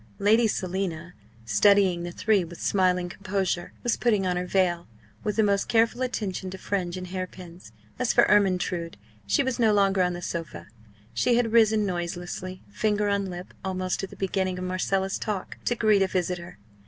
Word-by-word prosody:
Lady 220 +3 +4
Selina, 180 -3 -3 0.3
studying 185 - +4
the 175 0 -5
three 205 +1 +2
with 170 0 -10
smiling 180 -2 +1
composure, 185 -1 -2
was 240 - +1
putting 210 -5 +2
on 180 -1 0
her 180 0 -2
veil, 180 -2 +1 0.4
with 210 -2 -1
the 220 - +3
most 200 -1 +2
careful 230 +2 +2
attention 205 -7 -3
to 190 - -7
fringe 185 -2 -2
and 185 -1 -7
hairpins. 180 -5 -7 0.3
As 250 -2 +2
for - - +5
Ermyntrude, 180 - +1 0.3
she 100 - +3
was 260 -1 -2
no 225 -2 +4
longer 195 -2 +3
on 180 0 +1
the 175 - -6
sofa; 155 - -5 0.4
she 235 - +2
had 235 -2 +1
risen 220 -2 +4
noiselessly, 180 0 -4
finger 210 -1 0
on 200 -1 0
lip, 180 0 -8
almost 185 0 -2
at 195 - -4
the - - -12
beginning 190 -1 -1
of 185 - -4
Marcella's 190 +1 -1
talk, 205 -4 -4
to 240 - +1
greet 215 -3 +3
a 195 - +3
visitor. 180 - -3
190 Hz, 180 wpm, -26 LUFS, 180-205 Hz, 0.4 s, for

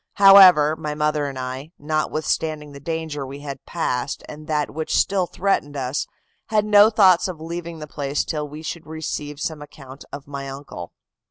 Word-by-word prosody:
However, 185 -6 +8
my 150 -1 -5
mother 150 -1 0
and 135 -1 -6
I, 130 +5 -6
notwithstanding 155 0 -2
the 140 - -10
danger 160 -1 -4
we 135 +1 -8
had 140 -2 -7
passed 135 -5 -2
and 150 +1 -10
that 150 -2 -1
which 160 +1 -1
still 190 -3 +2
threatened 160 -8 -1
us, 130 +1 -2 0.4
had 215 -1 +1
no 210 0 +7
thoughts 190 -5 +5
of 180 -4 -6
leaving 170 +1 -6
the 155 - -7
place 145 -1 -2
till 150 -2 -3
we 150 +2 -9
should 160 0 -6
receive 150 -2 -5
some 155 0 -4
account 135 -2 -12
from 140 - -7
my 140 -1 -6
uncle. 135 -11 -8
150 Hz, 175 wpm, -22 LUFS, 145-165 Hz, 0.4 s, However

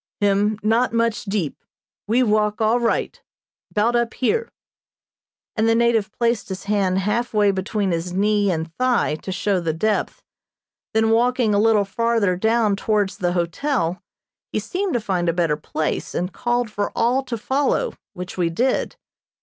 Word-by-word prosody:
"Him 205 +1 +2
not 225 +3 +2
much 230 -1 0
deep. 195 -7 -3 0.4
We 240 +4 +3
walk 210 -2 +1
all 225 +2 +3
right, 235 -1 -1 0.5
'bout 225 +3 +1
up 235 -1 0
here," 450 - 0 1.0
and 225 0 +2
the 225 - +4
native 230 -3 +2
placed 235 -3 -1
his 190 0 -5
hand 200 -2 +1
half 215 +5 -1
way 205 -1 +4
between 195 +1 -1
his 170 +1 -2
knee 205 +2 +2
and 160 -2 -2
thigh 255 -10 +2
to 190 - -7
show 195 +1 0
the 165 -2 -1
depth, 210 +6 -1 0.7
then 220 0 +3
walking 240 -1 +2
a 205 - +3
little 215 -1 +4
farther 225 -2 +1
down 220 +1 +2
towards 205 -1 0
the 175 -1 0
hotel 175 - -1 0.5
he - - -2
seemed 385 -1 -2
to 240 - +2
find 180 -5 -1
a - - +1
better 165 -3 +1
place, 155 0 -3
and 180 +1 -2
called 240 -2 -1
for 205 -1 -2
all 245 +3 +2
to 240 -2 -3
follow, 280 - 0 0.2
which 180 +1 -7
we 170 -2 +2
did. 245 +11 0
210 Hz, 165 wpm, -22 LUFS, 190-235 Hz, 1.0 s, the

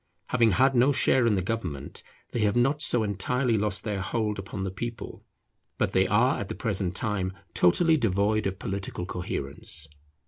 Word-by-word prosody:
Having 115 -3 +3
had 135 +6 +4
no 125 +4 +5
share 130 -3 +4
in 110 - +3
the 95 - -1
government, 90 -10 -4 0.3
they 120 - -2
have 105 -2 +2
not 135 +5 +2
so 120 -5 +4
entirely 115 +5 0
lost 105 -2 -1
their 105 -4 -2
hold 105 +2 -2
upon 95 0 -5
the 95 - -3
people; 115 +3 -7 0.5
but - - 0
they - - +2
are - - +2
at - - -5
the - - -4
present 90 -1 -2
time 95 -3 -1 0.2
totally 160 - +4
devoid 110 -2 +1
of 95 -1 -4
political 95 -2 -5
coherence. 85 -3 -3
105 Hz, 175 wpm, -27 LUFS, 95-120 Hz, 0.5 s, no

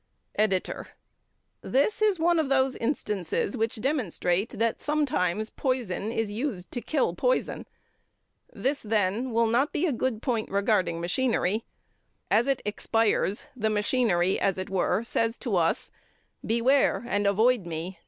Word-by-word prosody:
EDITOR: 200 -3 0 0.7
This 285 +12 +1
is 420 -3 +3
one 340 +1 +3
of 305 -4 0
those 265 -1 +2
instances 210 - -1
which 225 0 -1
demonstrate 215 - 0
that 230 +1 0
sometimes 220 - 0
poison 235 -6 -2
is 225 -3 -1
used 210 -5 -4
to 245 - -3
kill 310 - 0
poison. - - -1 0.8
This, 275 +2 -1
then, 215 +3 0
will 230 0 +2
not 240 +6 +2
be 335 - 0
a 315 - +1
good 240 -2 -1
point 230 -5 -1
regarding 195 -4 +1
machinery. 215 +3 0 0.7
As 225 +4 +4
it 275 -2 0
expires, 210 0 0
the 220 -3 0
machinery, 205 -4 +1
as 195 -2 +1
it 185 +1 -5
were, 195 +3 +1
says 230 0 0
to 230 -6 -2
us: 165 -2 +1 0.5
"Beware 240 +2 +2
and 205 -3 +1
avoid 220 0 +3
me. 170 +2 -5
225 Hz, 140 wpm, -27 LUFS, 195-260 Hz, 0.8 s, As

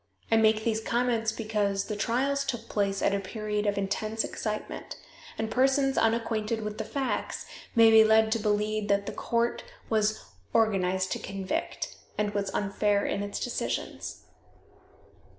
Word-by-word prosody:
I - - +6
make 220 0 +4
these 220 -1 0
comments 230 -1 +1
because 210 -3 -1
the 210 - -3
trials 270 +6 +1
took 240 -4 -4
place 200 -1 0
at 200 - +3
a 200 - +1
period 210 +1 -3
of 205 -1 +1
intense 215 +3 -1
excitement, 215 -1 -4 0.4
and 220 0 -2
persons 270 +1 +3
unacquainted 225 -1 +1
with 210 0 -5
the - - -1
facts 275 -2 -2 0.3
may 225 -1 +7
be 220 0 +9
led 220 0 +4
to 230 - +2
believe 210 0 0
that 200 0 +2
the - - -3
court 235 0 -1 0.3
was 215 -1 +1 0.3
"organized 190 -4 +2
to - - -1
convict," 195 -1 -4 0.2
and 210 -1 0
was 200 -1 -1
unfair 205 0 +1
in - - -1
its 205 0 -4
decisions. 245 - -3
215 Hz, 150 wpm, -28 LUFS, 205-225 Hz, 0.4 s, be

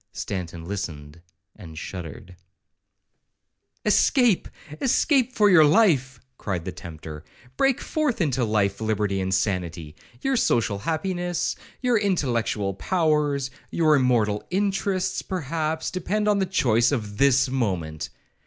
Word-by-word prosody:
Stanton 85 -4 -5
listened, 85 -5 -6 0.3
and 80 -6 -11
shuddered 90 +3 -8 1.5
'Escape—escape 245 - +2
for 215 -4 +3
your 180 -5 +7
life,' 145 - +3 0.2
cried 90 -4 -3
the 95 - -3
tempter; 80 -4 -9 0.3
'break 270 - +2
forth 305 -6 -1
into 135 -7 +1
life, 105 -2 0
liberty, 105 -3 0
and 95 0 -2
sanity. 90 -5 -2 0.3
Your 270 -1 +1
social 105 - +1
happiness, 175 - -2 0.3
your 245 -3 +2
intellectual 120 - 0
powers, 150 - 0 0.2
your 155 -2 +3
immortal 115 -6 +2
interests, 190 -1 0
perhaps, 160 -2 -3
depend 205 +4 -1
on 205 -1 +3
the 190 - 0
choice 120 - +2
of 105 -6 -3
this 135 -1 +4
moment. 95 -12 -2
130 Hz, 115 wpm, -24 LUFS, -, 1.5 s, your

